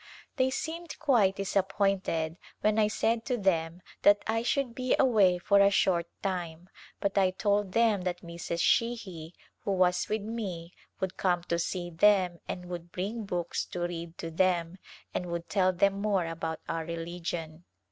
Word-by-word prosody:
They 260 Hz, -1 st, +3 dB
seemed 325 Hz, +5 st, -4 dB
quite 230 Hz, -11 st, +3 dB
disappointed 195 Hz, -4 st, 0 dB, 0.2 s
when 215 Hz, +1 st, +2 dB
I 210 Hz, -, +4 dB
said 225 Hz, +1 st, 0 dB
to 250 Hz, -2 st, 0 dB
them 175 Hz, -4 st, 0 dB, 0.2 s
that 205 Hz, 0 st, +5 dB
I 225 Hz, +1 st, 0 dB
should 250 Hz, 0 st, 0 dB
be 255 Hz, +1 st, +1 dB
away 210 Hz, -9 st, +4 dB
for 200 Hz, +3 st, +3 dB
a 200 Hz, 0 st, +7 dB
short 175 Hz, -3 st, +2 dB, 0.2 s
time, 180 Hz, -2 st, -3 dB, 0.3 s
but 200 Hz, 0 st, +1 dB
I 190 Hz, -1 st, +4 dB
told 200 Hz, 0 st, 0 dB
them 225 Hz, -4 st, +3 dB
that 180 Hz, -1 st, -3 dB
Mrs. 170 Hz, 0 st, -4 dB
Sheahy 190 Hz, -10 st, 0 dB, 0.2 s
who 200 Hz, -, -2 dB
was 180 Hz, -1 st, +2 dB
with 215 Hz, -1 st, -1 dB
me 190 Hz, -6 st, -5 dB, 0.3 s
would 190 Hz, -1 st, -3 dB
come 175 Hz, -2 st, +1 dB
to 170 Hz, -1 st, -1 dB
see 175 Hz, 0 st, -3 dB
them 180 Hz, 0 st, +3 dB
and 180 Hz, -, -5 dB
would 175 Hz, -1 st, -7 dB
bring 210 Hz, +5 st, -3 dB
books 175 Hz, -3 st, -2 dB
to 175 Hz, -, -6 dB
read 170 Hz, -1 st, -4 dB
to 165 Hz, -, -5 dB
them 175 Hz, 0 st, +1 dB, 0.3 s
and 180 Hz, -, -2 dB
would 170 Hz, 0 st, -4 dB
tell 185 Hz, 0 st, +3 dB
them 195 Hz, +2 st, +1 dB
more 200 Hz, -4 st, +1 dB
about 165 Hz, -1 st, -4 dB
our 165 Hz, -1 st, -2 dB
religion. 165 Hz, 0 st, -5 dB
185 Hz, 165 wpm, -29 LUFS, 170-205 Hz, 0.3 s, a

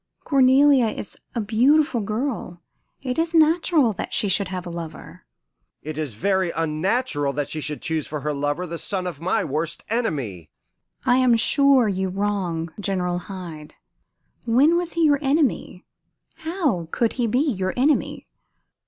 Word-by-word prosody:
Cornelia 270 Hz, -1 st, +5 dB
is 215 Hz, -, -6 dB, 0.2 s
a 235 Hz, -, 0 dB
beautiful 250 Hz, +5 st, +3 dB
girl; 215 Hz, -, -4 dB, 0.4 s
it 255 Hz, +2 st, -2 dB
is 330 Hz, +1 st, 0 dB
natural 315 Hz, -5 st, +4 dB
that -, -, -6 dB
she 205 Hz, -, +1 dB
should 195 Hz, 0 st, +1 dB
have 185 Hz, -1 st, -5 dB
a 175 Hz, -, -6 dB
lover." 170 Hz, -, -9 dB, 0.6 s
"It 155 Hz, 0 st, -5 dB
is 150 Hz, -7 st, -4 dB
very 190 Hz, -, +1 dB
unnatural 160 Hz, -, -1 dB
that 145 Hz, 0 st, -3 dB
she 155 Hz, -, -4 dB
should 150 Hz, 0 st, -5 dB
choose 160 Hz, -2 st, -2 dB
for 150 Hz, -1 st, -5 dB
her 150 Hz, +1 st, -2 dB
lover 145 Hz, +5 st, -2 dB
the 170 Hz, -1 st, -5 dB
son 190 Hz, -3 st, -1 dB
of 170 Hz, -4 st, -6 dB
my 185 Hz, +2 st, 0 dB
worst 155 Hz, +3 st, -3 dB
enemy." 135 Hz, -, -2 dB, 0.6 s
"I 245 Hz, -, +4 dB
am 255 Hz, -2 st, +4 dB
sure 275 Hz, 0 st, +4 dB
you 190 Hz, -1 st, -1 dB
wrong 180 Hz, -5 st, -2 dB
General 180 Hz, -3 st, -1 dB
Hyde. 175 Hz, -5 st, -9 dB, 0.7 s
When 275 Hz, +9 st, +4 dB
was 345 Hz, -1 st, -2 dB
he 335 Hz, -, +1 dB
your 290 Hz, -2 st, +4 dB
enemy? 275 Hz, -, 0 dB, 0.5 s
How 315 Hz, -, -1 dB
could 230 Hz, +6 st, 0 dB
he 235 Hz, -, +2 dB
be 245 Hz, +3 st, +1 dB
your 185 Hz, -3 st, -2 dB
enemy?" 285 Hz, +4 st, +1 dB
195 Hz, 155 wpm, -23 LUFS, 165-260 Hz, 0.7 s, Cornelia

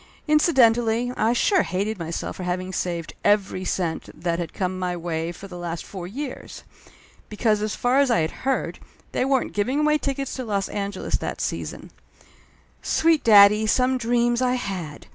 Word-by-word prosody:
Incidentally, 245 Hz, -6 st, +3 dB
I 225 Hz, +2 st, +2 dB
sure 375 Hz, -, +3 dB
hated 200 Hz, +3 st, -2 dB
myself 165 Hz, 0 st, -4 dB
for -, -, -6 dB
having 185 Hz, +1 st, -3 dB
saved 170 Hz, -3 st, -3 dB
every 200 Hz, -2 st, +2 dB
cent 175 Hz, -3 st, -2 dB
that 170 Hz, 0 st, -1 dB
had 170 Hz, -, -4 dB
come 185 Hz, -1 st, -3 dB
my 180 Hz, -1 st, -2 dB
way 165 Hz, -1 st, -3 dB
for 195 Hz, +3 st, -10 dB
the 180 Hz, -2 st, -9 dB
last 170 Hz, -1 st, -5 dB
four 185 Hz, -3 st, -7 dB
years! 265 Hz, +7 st, -7 dB, 0.7 s
Because, 215 Hz, 0 st, +1 dB
as 215 Hz, 0 st, -2 dB
far 250 Hz, +3 st, +2 dB
as 280 Hz, -2 st, +3 dB
I 235 Hz, -8 st, +3 dB
had 160 Hz, -, -1 dB
heard, 270 Hz, 0 st, -1 dB, 0.3 s
they -, -, 0 dB
weren't 270 Hz, -1 st, 0 dB
giving 255 Hz, +8 st, 0 dB
away 300 Hz, 0 st, +3 dB
tickets 275 Hz, -1 st, -3 dB
to 260 Hz, -, -3 dB
Los 200 Hz, -4 st, -2 dB
An 200 Hz, -1 st, -3 dB
geles 190 Hz, -, -3 dB
that -, -, -4 dB
season. -, -, -4 dB, 0.9 s
Sweet 325 Hz, -1 st, +2 dB
daddy, 210 Hz, 0 st, +7 dB
some 255 Hz, +3 st, +2 dB
dreams, 240 Hz, +1 st, +1 dB
I 250 Hz, 0 st, +2 dB
had 185 Hz, -, -5 dB
210 Hz, 175 wpm, -24 LUFS, 180-250 Hz, 0.9 s, daddy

